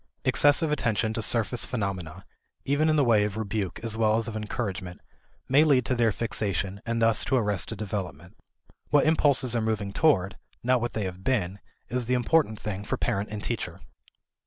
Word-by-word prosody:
Excessive 145 +2 +4
attention 110 -6 0
to 115 - -2
surface 115 +2 +2
phenomena 95 -9 -4 0.4
(even 145 +3 +2
in 155 - +3
the 145 - +3
way 115 -4 +4
of 105 0 -3
rebuke 100 -4 -3
as 115 -2 -2
well 110 -1 +2
as 115 - -1
of 115 - -5
encouragement) 105 -5 -4 0.5
may 140 +4 +5
lead 140 -6 +3
to - - 0
their 120 -2 +2
fixation 100 -3 -2
and 115 0 -1
thus 115 -1 +3
to 135 - 0
arrested 105 -2 0
development. 95 -5 -5 0.5
What 145 - +4
impulses 140 -6 +3
are 115 - +1
moving 110 -3 -2
toward, 100 - +2 0.2
not 125 0 +2
what 120 0 -3
they 110 - -2
have 95 0 -6
been, 100 -7 -1 0.3
is 125 -2 -2
the 125 - +2
important 125 -3 +1
thing 100 -1 -5
for - - -3
parent 100 +2 -2
and 105 0 -6
teacher. 115 - -4
110 Hz, 180 wpm, -26 LUFS, 100-125 Hz, 0.5 s, may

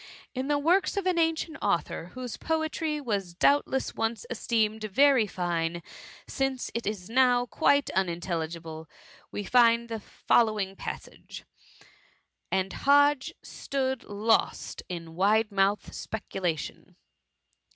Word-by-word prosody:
In 260 0 -3
the 295 0 +2
works 350 +8 +2
of 395 - -1
an 365 -2 +2
an 325 0 +3
cient 320 0 -5
author, 170 -4 -1
whose 250 -2 -5
poetry 315 -1 -1
was 200 -10 -3
doubtless 265 +4 +2
once 225 0 -2
esteemed 220 -2 0
very 255 +2 +4
fine, 170 -2 -2 0.4
since 270 -2 -2
it 235 -3 -3
is 200 -4 -3
now 245 0 +3
quite 285 +2 +2
unin 175 -3 0
telligible, 165 -2 -5 0.4
we 205 - -4
find 235 +1 +4
the 225 -1 -3
following 210 -2 +1
passage: - - -8 0.5
— - - -31
' - - -51
And 190 0 0
Hodge 285 -1 +3
stood 265 -2 -3
lost 215 +2 0
in 165 -2 -6
wide 210 +5 +2
mou&*d 200 +1 +1
speculation.' 185 -6 -4
225 Hz, 130 wpm, -28 LUFS, 190-270 Hz, 0.5 s, very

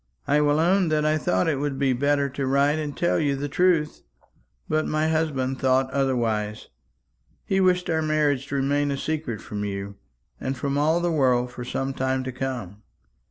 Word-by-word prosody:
I 145 +1 +3
will 145 0 +2
own 180 +3 +3
that 155 -1 +1
I 155 0 +2
thought 95 -9 +1
it 155 -4 +1
would 145 -1 -2
be 135 -2 +2
better 140 +2 +1
to 135 0 -3
write 140 +3 +2
and 150 -2 -5
tell 175 - +1
you 145 -3 +1
the 140 +2 -3
truth; 165 0 +1 0.7
but 155 0 0
my 155 +1 0
husband 135 -5 -1
thought 130 0 +2
otherwise. 115 -6 -1 0.8
He 195 - +1
wished 180 -1 +2
our 160 -1 +1
marriage 150 -3 +1
to 140 - -4
remain 145 +1 +1
a 140 - -1
secret 145 -7 -3
from 105 -1 -5
you, 100 0 -5 0.4
and 130 0 -3
from 140 +1 -2
all 155 +4 +2
the 175 0 0
world 125 -5 +2
for 125 - -7
some 135 +2 -3
time 130 0 -1
to 130 - -4
come. 125 -6 -5
140 Hz, 190 wpm, -24 LUFS, 130-155 Hz, 0.8 s, I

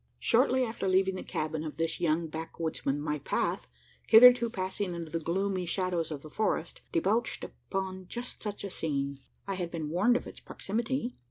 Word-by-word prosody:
Shortly 255 +2 +3
after 225 -4 -2
leaving 190 +1 +3
the 185 - -5
cabin 155 0 -3
of 155 - -6
this 165 0 -1
young 165 0 +2
backwoodsman, 160 -2 -3
my 150 0 -2
path, - - -1 0.4
hitherto 240 +1 +8
passing 190 -2 -3
under 165 -2 -6
the 165 - -1
gloomy 185 +2 -1
shadows 180 -2 0
of 145 -3 -6
the 155 - -9
forest, 200 -5 -1
debouched 210 +8 +1
upon 190 -1 -5
just 245 +4 -6
such 205 -2 -4
a 200 - -4
scene. 140 -4 -2 0.3
I 195 - -2
had 180 -2 -3
been 160 -3 -4
warned 205 +9 +3
of - - -7
its - - -9
proximity. 240 +4 -3
185 Hz, 175 wpm, -30 LUFS, 160-210 Hz, 0.4 s, hitherto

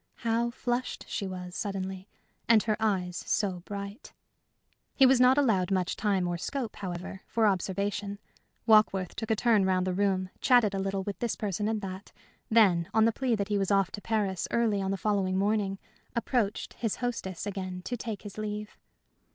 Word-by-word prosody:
How 230 +1 +2
flushed 245 +1 -3
she 195 - -3
was 180 -1 -6
suddenly, 190 -1 -4 0.4
and 225 -2 +6
her 215 -2 +1
eyes 185 -5 0
so 195 -4 0
bright! 200 +4 -7 0.8
He 270 - +6
was 260 -1 +5
not 255 +2 +6
allowed 215 -11 +3
much 185 -2 0
time 195 -4 +1
or 175 -1 -2
scope, 245 +3 -4
however, 185 0 -6
for 225 -1 +1
observation. 200 +1 -1 0.5
Warkworth 215 -5 +4
took 225 - -5
a 220 - +3
turn 220 -2 +3
round 185 -1 +2
the 185 - 0
room, 190 -1 +1
chatted 245 -6 +4
a 195 - -1
little 195 0 -1
with 200 -2 -5
this 235 -2 -1
person 205 -1 -2
and 220 -1 -1
that, 190 0 -7 0.4
then, 190 -6 +4
on 220 0 +6
the 230 - +4
plea 250 0 0
that 200 -1 -2
he 205 -1 +1
was 195 - 0
off 195 -2 +3
to 205 - -6
Paris 205 -5 -1
early 220 -4 +1
on 190 - -1
the 195 - -1
following 195 -2 0
morning, 200 -1 +1 0.4
approached 235 -3 -1
his 225 -4 -2
hostess 230 -8 -3
again 185 -2 -5
to 245 - -3
take 225 -3 -5
his 205 0 -8
leave. 210 0 -5
205 Hz, 185 wpm, -29 LUFS, 190-220 Hz, 0.8 s, and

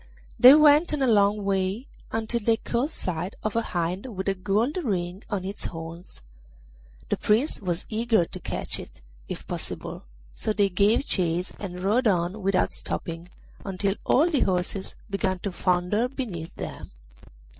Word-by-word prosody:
They 255 +3 +11
went 300 +1 +6
on 280 - -1
a - - +3
long 205 -2 +3
way, 195 +4 0 0.3
until 225 +1 0
they 225 +1 +2
caught 240 +5 -1
sight 180 - -3
of 215 0 -2
a 230 - +3
hind 180 +1 -2
with 190 - -3
a - - +2
gold 210 - 0
ring 190 - -2
on 200 -4 -2
its 195 +2 -4
horns. 165 - -8 0.9
The - - +1
Prince 225 +7 +2
was 175 -2 -2
eager 220 -4 +2
to - - -9
catch - - -3
it, - - -12 0.3
if - - -6
possible, - - -5 0.3
so 215 - -2
they 205 -1 +3
gave 200 +8 +3
chase 175 0 0
and 180 -3 -6
rode 220 +6 +2
on 180 +1 +1
without 195 -1 +2
stopping 165 +1 -4 0.3
until 195 0 -1
all 300 +6 +4
the 310 -6 +1
horses 190 0 -1
began 195 -2 -1
to 195 +2 -4
founder 180 +6 +1
beneath 210 - -6
them. - - -7
200 Hz, 160 wpm, -26 LUFS, 180-230 Hz, 0.9 s, They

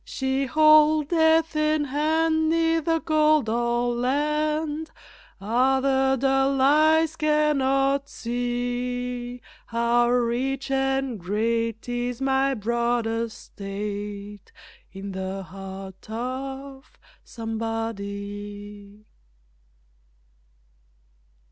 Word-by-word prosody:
She 265 0 -2
holdeth 310 +2 +4
in 305 0 +2
hand 315 +3 +1
neither 330 0 +2
gold 310 -4 +3
or 240 +1 0
land 300 +4 -1 0.5
Ah, 250 +6 +2
the 265 0 +2
dull 270 +1 +2
eyes 310 +3 +4
cannot 280 -3 +1
see 245 0 -3 0.2
How 235 +1 +2
rich 250 +3 0
and 270 -3 0
great 225 +4 -1
is 245 0 -3
my 270 0 +1
broad 235 +1 0
estate 205 -2 -5 0.4
In 195 +1 -7
the 190 +1 -4
heart 190 +2 -10
of 265 +3 -6 0.3
somebody. 205 -2 -6
250 Hz, 75 wpm, -25 LUFS, 225-290 Hz, 0.5 s, holdeth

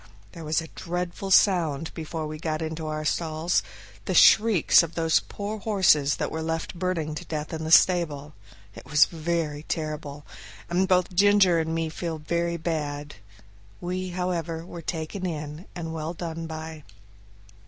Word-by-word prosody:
There 165 - -9
was 155 +2 0
a 160 - -8
dreadful 180 +2 -4
sound 165 -6 +3
before 160 -1 -5
we 155 0 -6
got 155 0 -2
into 160 0 -4
our 155 0 -3
stalls 160 +2 0 0.4
the - - -1
shrieks 215 -6 +6
of 170 -1 -5
those 165 -1 +3
poor 210 +1 -6
horses 185 -10 +3
that - - -3
were 160 - -3
left 165 0 -3
burning 170 -4 -2
to 150 - -6
death 155 0 -5
in 160 0 -4
the - - -3
stable 155 -5 +4 0.4
it - - -12
was 150 +1 +6
very 160 -2 -2
terrible! 150 -2 -5 0.5
and 175 - +1
made 190 - +3
both 185 -1 +2
Ginger 195 -2 +5
and 160 0 -1
me 165 0 -1
feel 165 0 -4
very 170 +2 -1
bad. 145 - -4 0.6
We, 185 +1 -3
however, 170 -2 -3
were 175 -1 -8
taken 165 +4 -4
in 150 +1 -6
and 165 -2 -5
well 160 +1 -4
done 165 -1 -5
by. 160 -1 -7
165 Hz, 165 wpm, -26 LUFS, 155-175 Hz, 0.6 s, shrieks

